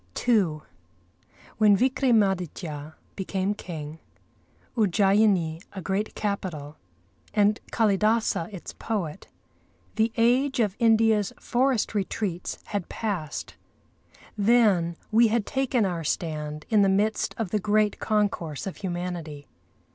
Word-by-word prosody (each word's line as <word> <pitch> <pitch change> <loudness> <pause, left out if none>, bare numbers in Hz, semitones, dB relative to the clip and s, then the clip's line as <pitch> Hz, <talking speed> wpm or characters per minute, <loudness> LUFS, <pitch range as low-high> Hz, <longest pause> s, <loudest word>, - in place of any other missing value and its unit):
II 185 -11 +3 1.0
When 210 -2 +6
Vikramâditya 190 - 0 0.2
became 190 +1 -1
king, 160 -6 -7 0.8
Ujjayini 195 -5 +3
a 190 - -6
great 195 +4 -2
capital, 175 -8 -4 0.6
and 210 0 +3
Kâlidâsa 215 -3 +1
its 190 -4 -8
poet, 195 -6 -4 0.7
the 220 +1 +2
age 250 +4 +3
of 210 -4 +1
India's 225 -3 +3
forest 255 -2 +1
retreats 195 -3 -2
had 200 -4 -4
passed. 190 -9 -4 0.8
Then 200 -6 +3
we 230 +2 +6
had 220 -1 0
taken 265 -5 0
our 175 -3 -2
stand 150 -1 -3
in 215 -2 +4
the 195 - +4
midst 210 +3 +1
of 220 -6 -3
the 215 - +1
great 210 +1 +1
concourse 200 -8 -1
of 195 - -5
humanity. 175 -5 -5
200 Hz, 110 wpm, -26 LUFS, 175-220 Hz, 1.0 s, When